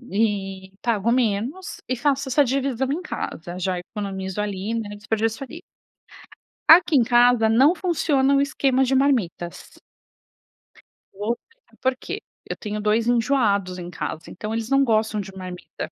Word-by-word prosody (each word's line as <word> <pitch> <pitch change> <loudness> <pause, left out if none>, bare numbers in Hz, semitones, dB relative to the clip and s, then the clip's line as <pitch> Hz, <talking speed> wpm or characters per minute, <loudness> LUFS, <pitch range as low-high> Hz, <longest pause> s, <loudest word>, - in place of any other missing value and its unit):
e 195 -5 -2
pago 235 -1 +1
menos 250 - -1
e 255 - +1
faço 280 +1 0
essa 285 +3 +4
dívisão 265 0 -1
em 310 - -1
casa. 175 - -5
Já 185 0 -1
economizo 190 0 -5
ali, 205 +2 -3
né? 225 -2 -3
Não 205 - -8
desperdiça 220 +3 -2
ali. 325 +6 -10 1.1
Aqui 325 -1 +7
em 240 - +5
casa 240 -1 +4
não 265 +9 +5
funciona 290 -7 +1
o 275 - +4
esquema 270 -2 +2
de 265 +1 +1
marmitas. 225 -11 -1 1.3
Vou 210 +4 -2
te 460 - -33
falar - - -26
porque. 260 0 -2 0.3
Eu - - -2
tenho 210 -1 -4
2 215 +2 +1
enjoados 225 -7 +2
em 175 0 -7
casa, 160 -1 -5
então 210 +4 -6
eles 230 0 -3
não 275 0 +4
gostam 220 -3 +1
de 195 0 -9
marmita. 180 -3 -7
225 Hz, 155 wpm, -23 LUFS, 200-265 Hz, 1.3 s, Aqui